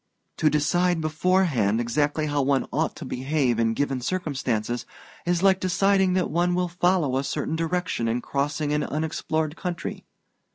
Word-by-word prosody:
To 155 - +3
decide 175 +4 +2
beforehand 155 - +1
exactly 145 +6 0
how 145 -1 0
one 135 0 +1
ought 160 +2 0
to 165 - -8
behave 130 -2 0
in 115 -1 +1
given 135 -1 -1
circumstances 125 -8 -2 0.4
is 175 +1 +1
like 190 -1 +5
deciding 190 +1 +2
that 185 -4 0
one 175 +2 +1
will 180 0 0
follow 175 -6 +1
a 135 - 0
certain 150 +2 -2
direction 165 -7 -1
in 115 +2 0
crossing 145 +3 -1
an 150 0 +1
unexplored 155 0 -2
country. 175 -3 -5
155 Hz, 155 wpm, -25 LUFS, 135-175 Hz, 0.4 s, like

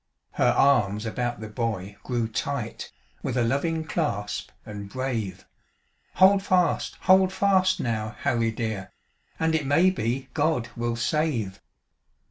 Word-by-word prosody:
Her - - +2
arms 105 -6 +3
about 120 0 -2
the 110 - -5
boy 105 -4 -3
grew 120 -3 -1
tight, 110 - -4 0.3
With 125 - -2
a 120 - +3
loving 160 +7 0
clasp, 145 - -2 0.2
and 100 -2 -7
brave; 110 -6 -3 0.7
"Hold 195 +1 +6
fast! 180 -3 +1
Hold 190 0 +5
fast, 190 -1 +2
now, 110 -4 -2
Harry 115 -1 +1
dear, 110 -4 -4 0.5
And 160 0 +1
it 155 -4 0
may 165 +7 +4
be 130 -4 -2
God 150 -6 0
will 120 0 -1
save." 120 -6 -1
120 Hz, 130 wpm, -26 LUFS, 110-160 Hz, 0.7 s, Hold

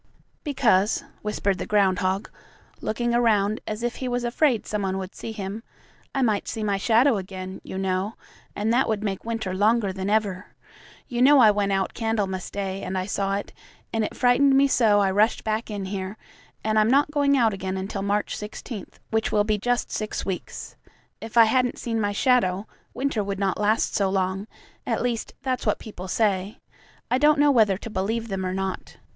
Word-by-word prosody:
"Because," 220 - +2 0.2
whispered 205 -2 -1
the - - -4
groundhog, 190 -1 +1 0.5
looking 240 +2 -1
around 215 -3 +2
as 215 +2 -4
if 240 0 -2
he 260 - -4
was 245 0 -1
afraid 240 -1 +1
some 210 -1 -2
one 190 -1 -1
would 190 0 -6
see 225 - -7
him, 205 0 -5 0.5
"I 270 - +2
might 215 -4 +1
see 220 - -3
my 200 -2 +1
shadow 230 +4 +3
again, 185 -1 -7
you 190 - -7
know, 190 +2 -1 0.4
and 215 +2 0
that 255 0 +2
would 215 -1 -1
make 195 -1 -3
winter 225 -5 -3
longer 205 0 +2
than 190 +1 -3
ever. 205 -3 -1 0.5
You 245 -2 -2
know 285 +3 +7
I 225 -5 +7
went 205 -1 0
out 195 -1 0
Candlemas 205 -5 -2
Day 195 -1 -4
and 190 +1 -3
I 185 - -1
saw 195 0 -1
it, 200 - -5 0.4
and 225 -1 +1
it - - -4
frightened 270 +2 +4
me 280 +1 +5
so 220 -6 +4
I 195 -1 +2
rushed 210 +4 +2
back 220 +2 -2
in 205 -2 -4
here, 190 +1 -5 0.5
and 215 0 +2
I'm 215 +1 +3
not 285 +3 +3
going 285 -2 +3
out 230 -4 +3
again 190 0 -3
until 195 +1 -4
March 205 +1 -1
16, 210 0 -7 0.2
which 220 0 0
will 210 -1 +3
be 210 0 0
just 245 +3 0
six 215 0 -3
weeks. 190 -2 -5 0.5
If 225 +1 -6
I 230 - +10
hadn't 250 +2 +1
seen 225 -2 -2
my 205 -1 0
shadow, 200 -4 +2 0.3
winter 260 -5 -1
would 200 0 -3
not 195 -1 -1
last 210 +2 +1
so 195 -2 +1
long 190 +1 -1 0.4
at - - -1
least, 240 -2 -2
that's 260 -1 -2
what - - +2
people 190 -5 -9
say. 195 0 0 0.5
I 250 - +3
don't 300 +1 +5
know 290 0 +5
whether 215 -7 +4
to 225 - -8
believe 225 +4 -2
them 195 -1 -2
or 185 0 -2
not. 190 -1 -4
210 Hz, 195 wpm, -25 LUFS, 195-235 Hz, 0.5 s, I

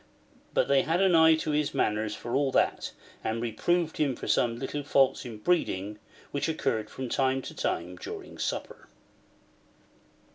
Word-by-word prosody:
But - - +3
they 140 -1 +4
had 165 +3 0
an 190 -2 +4
eye 160 -1 +7
to 160 -1 -2
his 150 0 0
manners 105 0 0
for 120 - -6
all 140 -1 +2
that, - - +1 0.3
and 110 +1 -1
reproved 160 +9 0
him 140 -4 +1
for - - -7
some 115 -1 +2
little 135 +3 -3
faults 135 -2 +2
in 115 -3 -7
breeding, 105 - 0 0.3
which 145 +3 -1
occurred 115 -9 -1
from 130 - -5
time 130 +1 +1
to - - -7
time 90 +2 -2
during - - -8
supper. - - -4
135 Hz, 160 wpm, -28 LUFS, 110-155 Hz, 0.3 s, eye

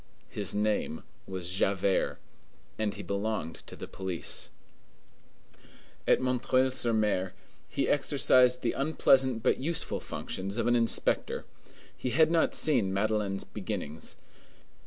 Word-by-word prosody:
His 100 -2 -3
name 105 -6 0 0.2
was 90 -2 -4
Javert, 95 0 +1 0.6
and 110 -2 -1
he - - -7
belonged 100 -4 -2
to - - -9
the - - -7
police. 95 -3 -2 1.6
At - - +5
M. 125 -1 0 0.3
sur 125 -2 -1
M. 105 -4 +1 0.4
he - - -1
exercised 125 0 +3
the 120 - +2
unpleasant 130 -4 +2
but - - +2
useful 160 +5 -1
functions 95 +3 -5
of 115 - 0
an 120 - +3
inspector. 115 -1 +2 0.5
He 125 - -3
had 155 +6 +4
not 165 -1 +2
seen 125 -11 +3
Madeleine's 100 0 0
beginnings. 80 +2 -5
110 Hz, 120 wpm, -29 LUFS, 95-125 Hz, 1.6 s, At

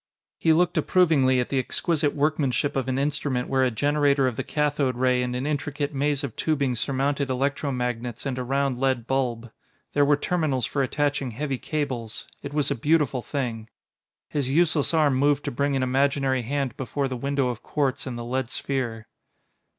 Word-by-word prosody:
He 165 - +3
looked 175 +2 +3
approvingly 145 -8 +3
at 125 - -1
the 135 - +1
exquisite 150 +2 0
workmanship 145 -2 +1
of 135 -2 -1
an 130 0 0
instrument 140 -3 -1
where 130 -1 +2
a 130 - +3
generator 145 +2 +2
of 125 -3 0
the - - -2
cathode 145 -3 0
ray 125 0 +2
and 125 0 -2
an 125 +2 -2
intricate 145 0 -2
maze 145 +1 0
of 130 -6 -4
tubing 140 -5 0
surmounted 140 +3 -1
electro 140 +2 0
magnets 125 -1 -3
and 130 -2 -2
a - - -2
round 135 0 0
lead 130 -3 +1
bulb. 120 -3 -1 0.4
There 145 - +4
were 145 0 +4
terminals 145 -7 0
for 140 - -1
attaching 140 0 0
heavy 135 +2 -3
cables; 130 -7 -3 0.2
it 140 - -6
was 145 -2 0
a - - +1
beautiful 145 -1 +1
thing.... 115 -5 -4 0.6
His 140 -3 -1
useless 155 0 +3
arm 155 -4 +3
moved 145 +2 +2
to - - -1
bring 140 +3 0
an 135 - +1
imaginary 135 0 +1
hand 135 0 -2
before 135 +2 -2
the 130 - -4
window 140 +1 0
of 120 -2 -5
quartz 140 -2 -1
in 125 - -4
the 120 0 -5
lead 130 0 -2
sphere. 130 -6 -3
135 Hz, 185 wpm, -25 LUFS, 125-145 Hz, 0.6 s, There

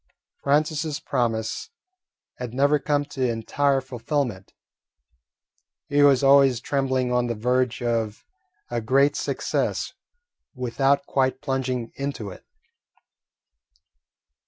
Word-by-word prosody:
Francis's 150 +1 +1
promise 115 - -2 0.7
had 125 -1 -6
never 145 +2 +3
come 145 +1 0
to 130 -3 -1
entire 135 +5 +1
fulfilment. 125 -5 -3 1.4
He 145 0 +3
was 140 -2 +5
always 135 -3 +6
trembling 130 -1 0
on 125 0 +2
the 120 - -2
verge 125 +2 0
of 115 -3 -1 0.5
a 120 -1 -1
great 135 +5 +3
success - - -1 0.6
without 135 +3 +1
quite 130 -1 0
plunging 130 -4 -2
into 140 -8 -4
it. - - -12
130 Hz, 100 wpm, -24 LUFS, 120-140 Hz, 1.4 s, always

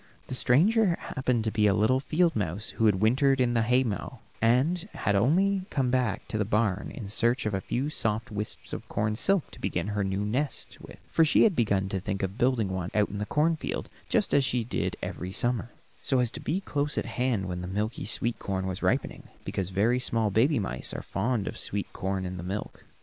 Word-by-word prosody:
The - - -4
stranger 180 - +3
happened 125 -4 -1
to 110 - -1
be 105 -1 +3
a 100 - +3
little 110 +5 +3
field 165 +5 +1
mouse 100 0 -2
who 115 - +1
had 100 -2 +2
wintered 135 +4 +3
in 125 -2 +2
the 115 - +2
haymow, 125 0 0 0.2
and 145 - +2
had 100 - 0
only 185 - +2
come 130 -3 0
back 120 -5 0
to 110 - -2
the - - +3
barn 105 -2 0
in 105 - -7
search 115 +4 +2
of 105 - -1
a 95 - -1
few 130 +8 -2
soft 110 -4 -1
wisps 105 0 -4
of - - -6
corn 105 +1 0
silk 195 - +2
to - - -13
begin 90 +3 -2
her 105 -1 -1
new 95 +1 -1
nest 130 +7 -2
with, - - -12
for 165 - +4
she 155 - +5
had 205 -6 +4
begun 100 -6 +1
to 95 - -1
think 100 +1 -3
of 95 +4 -3
building 120 -5 +2
one 95 -1 -3
out 105 -1 +3
in 100 - -5
the 105 - -3
corn 160 +2 +2
field, 155 - -4 0.2
just - - +1
as 140 - +5
she 125 -2 +1
did 115 - -2
every 90 +2 -4
summer, 120 +3 0 0.3
so 135 - +1
as 125 -2 +1
to - - -7
be 180 +6 -1
close 145 -5 -1
at - - 0
hand 120 -7 -1
when 90 -1 -4
the 90 - -5
milky 105 +4 -2
sweet 115 +3 +1
corn 95 -1 -2
was 95 -1 -4
ripening, - - -1 0.2
because 95 -2 -2
very 110 +6 +2
small 115 -4 0
baby 130 +9 +3
mice 100 - -2
are - - -5
fond 110 +1 -1
of - - -4
sweet 100 0 -4
corn 95 0 -2
in 90 0 -5
the 90 - -6
milk. 95 +3 -5
115 Hz, 225 wpm, -28 LUFS, 100-130 Hz, 0.3 s, she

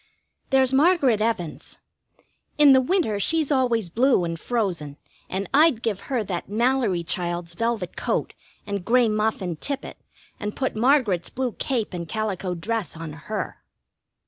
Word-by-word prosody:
There's 265 -1 +3
Margaret 275 - +4
Evans. 215 -8 -2 0.8
In 295 -2 +8
the 260 - +6
winter 285 - +1
she's 315 +7 +2
always 235 - +1
blue 245 -2 +3
and 165 -1 -3
frozen, 175 -12 -2 0.3
and 195 +1 -3
I'd 290 -5 +4
give 210 -4 -1
her 250 -5 0
that 185 -3 -4
Mallory 230 -5 +1
child's 175 0 -3
velvet 230 -1 -2
coat - - -1 0.3
and 200 -2 -3
gray 240 +3 +4
muff 215 -1 0
and 170 -4 -4
tippet, 280 -1 -4 0.4
and 210 0 -4
put 265 -4 -2
Margaret's 230 - +2
blue 255 -1 -2
cape 235 -3 -2
and 170 -2 -5
calico 195 -4 -2
dress 200 -1 -3
on 160 -2 -6
her. 160 +8 -5
220 Hz, 145 wpm, -24 LUFS, 180-260 Hz, 0.8 s, In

